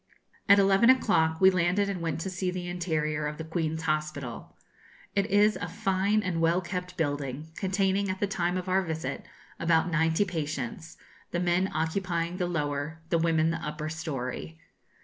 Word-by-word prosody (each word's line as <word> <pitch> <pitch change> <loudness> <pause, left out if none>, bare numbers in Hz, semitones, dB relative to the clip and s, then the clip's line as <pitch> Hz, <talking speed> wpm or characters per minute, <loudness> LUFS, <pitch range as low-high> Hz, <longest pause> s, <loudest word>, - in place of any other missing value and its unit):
At 200 - +9
eleven 195 +3 +5
o'clock 160 -11 +3
we 190 0 +7
landed 185 +3 +2
and 195 -3 -3
went 165 -1 -2
to 190 - -3
see 185 0 -2
the 180 -1 -4
interior 155 -4 -1
of 150 0 -5
the 160 - -5
Queen's 160 -1 -2
Hospital. 155 -5 -3 0.6
It 200 0 +2
is 210 0 +4
a - - -4
fine 195 +3 +1
and 175 -3 -1
well 165 +2 +3
kept 180 0 -5
building, 145 0 -2
containing, 195 0 0
at 185 0 -3
the - - +2
time 180 -2 -1
of 185 0 -4
our 185 +1 +3
visit, 160 -3 -4 0.4
about 170 +1 +2
ninety 160 +4 +2
patients, 155 -3 -4 0.3
the 175 - -2
men 180 +2 +2
occupying 170 +2 -1
the 180 -2 0
lower, 150 -1 -3
the 170 - +2
women 165 -1 +2
the - - -2
upper 150 +1 -4
story. 130 - -5
170 Hz, 170 wpm, -28 LUFS, 155-185 Hz, 0.6 s, At